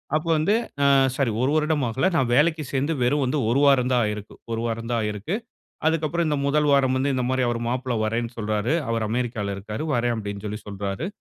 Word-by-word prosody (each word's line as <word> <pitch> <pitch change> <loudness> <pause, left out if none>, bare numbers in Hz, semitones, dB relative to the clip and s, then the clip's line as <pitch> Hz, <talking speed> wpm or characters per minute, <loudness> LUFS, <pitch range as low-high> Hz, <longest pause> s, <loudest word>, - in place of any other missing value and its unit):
அப்ப 155 +2 -1
வந்து 160 +7 +2 0.3
அ - - +4 0.3
சாரி 135 -5 +1
1 130 +3 +2
வருடம் 155 -3 +1
ஆகல. 125 +8 0
நான் 130 -6 +2
வேலைக்கு 155 +3 +3
சேர்ந்து 140 +4 +1
வெறும் 140 +4 +2
வந்து 130 +4 0
1 130 - +2
வாரம் 130 -2 +4
தான் 125 - +3
ஆயிருக்கும். 105 0 -6
1 115 0 -1
வாரம் 115 0 -3
தான் 115 - +1
ஆயிருக்கு. 105 - -3 0.5
அதுக்கப்புறம் 160 +1 +1
இந்த 150 - +1
1 150 +1 +2
வாரம் 135 -2 +3
வந்து 135 +2 +1
இந்த 130 - 0
மாரி 130 0 +1
அவர் 120 -1 -1
மாப்பிள்ள 125 0 -1
வர்றேன்னு 115 +2 -1
சொல்றாரு. 110 +3 -1 0.2
அவரு 115 -1 0
அமெரிக்கால 115 -4 -2
இருக்காரு. 105 +4 -5
"வர்றேன்" 120 0 +1
அப்டின்னு 100 -1 -5
சொல்லி 105 +1 -4
சொல்றாரு. 100 - -4
125 Hz, 205 wpm, -24 LUFS, 110-145 Hz, 0.5 s, அ